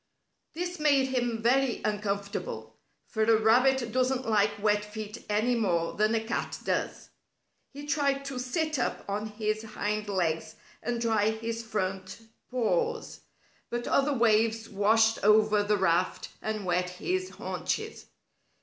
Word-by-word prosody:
This 355 +1 -4
made 280 -3 +3
him 240 -3 -1
very 260 +1 +2
uncomfortable, 200 - -3 0.3
for 220 - -3
a 220 0 +4
rabbit 245 +2 +3
doesn't 255 +1 0
like 210 -2 +2
wet 210 0 +2
feet 210 0 -7
any 215 +4 +2
more 175 -8 0
than 215 +2 +2
a 225 - 0
cat 230 +1 -3
does. - - -2 0.6
He 285 +1 -9
tried 280 -2 0
to 275 -2 -4
sit 305 +4 -1
up 245 - -2
on 205 +2 -2
his 215 0 -2
hind 215 -1 -3
legs 170 -5 -1 0.3
and 240 -1 -2
dry 220 -2 +2
his 225 +1 -3
front 190 -4 -3 0.3
paws, 255 - -1 0.5
but 240 0 -3
other 280 +1 +2
waves 225 -1 +2
washed 220 +2 +3
over 210 0 +5
the 205 0 +1
raft 180 -1 +1
and 215 -2 -3
wet 180 0 +1
his 370 - -2
haunches. - - -4
220 Hz, 140 wpm, -28 LUFS, 205-250 Hz, 0.6 s, over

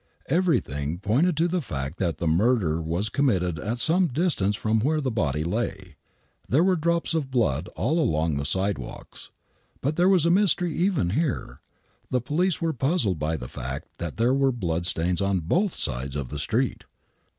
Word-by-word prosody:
Everything 90 - 0
pointed 135 - +1
to 165 +2 +3
the 175 0 -1
fact 70 - -5
that 85 -4 -1
the - - -3
murder 85 -1 +2
was 85 +6 -1
committed 95 - 0
at 110 +8 -3
some 175 +8 +3
distance 130 - 0
from 110 +1 0
where 150 +7 +1
the 135 -3 -1
boiT 75 -8 -1
lav. 95 -2 -3 0.6
There 145 +7 +4
were 185 0 +3
drops 170 0 0
of 155 -5 -1
blood 90 - 0
all 155 +9 0
along 80 - +1
the 70 - -2
sidewalks. 95 +7 -3 0.5
But 145 +3 -2
there 180 +2 +4
was 180 -5 +4
a 170 - +4
mystery 180 -3 +2
even 170 - +1
here. 150 - -2 0.5
The 125 - +1
police 165 +8 0
were 165 -1 0
puzzled 130 - +1
by 80 +2 -1
the 60 - -7
fact 65 +4 -6
that 85 -3 -5
there 120 +3 +3
were 135 0 +3
blood 85 -7 -2
stains 85 +2 0
on 100 -1 +1
both 175 - 0
sides 70 0 -2
of 70 -4 -3
the 75 - -5
street. 120 - -1
110 Hz, 180 wpm, -25 LUFS, -, 0.6 s, There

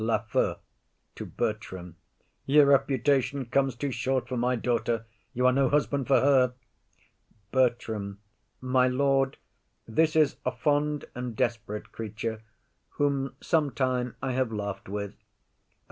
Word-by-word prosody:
LAFEW. 110 -1 +1 0.6
[To - - -7
Bertram] 95 -5 -4 0.5
Your 145 +1 +6
reputation 135 0 +2
comes 135 +1 +1
too 140 +3 -3
short 130 0 -1
for 130 - -3
my 125 +1 +1
daughter; 115 -1 -1 0.3
you 125 +1 0
are 130 - +6
no 135 -1 +3
husband 140 -2 +1
for 135 - +4
her. 130 -3 +4 1.0
BERTRAM. 115 -6 0 0.4
My 130 0 +3
lord, 135 +1 +1 0.5
this 155 +8 +2
is 155 -2 +3
a 125 - 0
fond 145 +3 0
and 125 -2 -5
desperate 115 -4 -2
creature 110 0 -5 0.6
Whom 140 -2 0
sometime 130 -6 0
I 130 - 0
have 130 -2 0
laugh'd 100 -2 -4
with. 100 +1 -4
125 Hz, 125 wpm, -28 LUFS, 115-140 Hz, 1.0 s, Your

